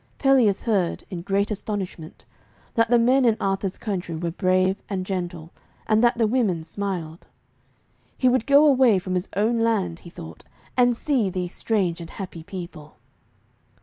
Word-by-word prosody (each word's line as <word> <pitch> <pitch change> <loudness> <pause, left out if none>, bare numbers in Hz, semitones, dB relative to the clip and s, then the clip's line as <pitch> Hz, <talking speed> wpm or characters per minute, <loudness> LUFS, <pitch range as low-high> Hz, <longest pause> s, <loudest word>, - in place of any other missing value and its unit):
Pelleas 255 -8 +3
heard, 200 -7 0
in 175 -2 -4
great 200 +3 0
astonishment, 195 -6 -5 0.5
that 230 0 +2
the 240 - +5
men 255 +3 +4
in 230 -3 +3
Arthur's 195 -1 -1
country 185 -6 -4
were 170 +1 -3
brave 185 +1 +1
and 190 -2 -3
gentle, 175 -3 -4 0.3
and 220 +1 +2
that 240 0 +3
the 230 - +3
women 210 -8 0
smiled. 175 -3 -5 0.9
He 255 - +2
would 250 -1 +2
go 285 +2 +6
away 260 -7 +5
from 185 0 -4
his 180 +2 -2
own 225 +4 +1
land, 200 -7 0
he 170 - -12
thought, 80 - -11 0.3
and 245 -2 +3
see 255 -9 +1
these 180 -1 -4
strange 185 -6 -1
and 165 - -8
happy 180 -4 -8
people. 170 -3 -9
195 Hz, 160 wpm, -24 LUFS, 175-230 Hz, 0.9 s, go